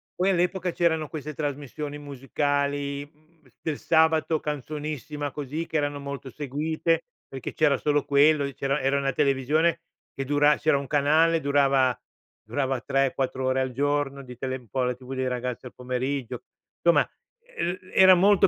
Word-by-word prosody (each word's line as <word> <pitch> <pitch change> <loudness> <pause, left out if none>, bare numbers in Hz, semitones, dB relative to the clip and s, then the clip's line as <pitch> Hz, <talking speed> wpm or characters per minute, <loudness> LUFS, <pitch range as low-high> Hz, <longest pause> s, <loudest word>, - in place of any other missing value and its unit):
poi 185 +2 +2
all'epoca 180 0 +1
c'erano 160 -3 +1
queste 155 -1 -6
trasmissioni 145 0 -4
musicali, 145 0 -2
mhmm, 155 -1 -29
del 155 -3 -3
sabato, 160 -1 +3
"Canzonissima", 150 0 -4
così, 150 +4 -4
che 160 - -2
erano 145 -1 -1
molto 140 -1 -6
seguite, 155 +4 -1 0.2
perché 135 -2 -6
c'era 145 -4 +3
solo 145 -1 +1
quello, 145 +1 +4
e 140 -1 -3
c'era 140 +1 -1
era 135 +1 +1
una 135 -1 0
televisione, 150 +6 +2 0.3
che 135 - -4
dura 145 +1 +4
c'era 150 -2 +2
1 140 - -4
canale, 155 +3 +3
durava 135 -3 +3 0.5
durava 135 -3 -1
3-4 135 -1 0
ore 130 0 +1
al 130 -1 -1
giorno 140 +1 -1
di 125 -1 -10
tele 130 0 -3
un 120 -3 -18
po' 130 - -1
la 125 0 0
TV 130 +1 -9
dei 130 0 -1
ragazzi 125 0 -3
al - - -13
pomeriggio, 125 0 -3 0.4
insomma, 170 0 +4 0.3
e 185 - -3 0.2
era 190 0 +8
molto 195 +1 +5
145 Hz, 160 wpm, -26 LUFS, 135-155 Hz, 0.5 s, era